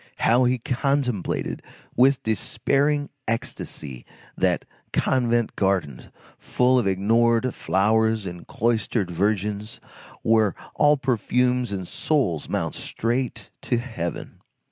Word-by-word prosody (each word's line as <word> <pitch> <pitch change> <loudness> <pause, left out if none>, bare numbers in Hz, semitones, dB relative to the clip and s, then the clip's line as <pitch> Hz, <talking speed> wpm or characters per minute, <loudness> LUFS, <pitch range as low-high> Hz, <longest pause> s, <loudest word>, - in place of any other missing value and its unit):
How 125 +2 +3
he 125 +1 +2
contemplated, 125 -3 -1 0.3
with 130 +2 +4
despairing 140 +6 0 0.2
ecstasy, 75 - -5 0.3
that - - +1 0.3
convent 120 -3 +1
garden, 95 -10 -1 0.3
full 125 +1 +2
of 115 - 0
ignored 115 +5 +2
flowers 110 +2 +1
and 90 -1 -7
cloistered 110 -4 0
virgins, 105 +4 -1 0.4
where 110 -2 +3 0.2
all 150 0 +4
perfumes 125 -1 +1
and 100 -2 -2
all - - -7
souls 90 - 0
mount - - -1
straight 115 -3 -3
to 125 - 0
heaven! 110 -9 -5
115 Hz, 105 wpm, -24 LUFS, 100-125 Hz, 0.4 s, with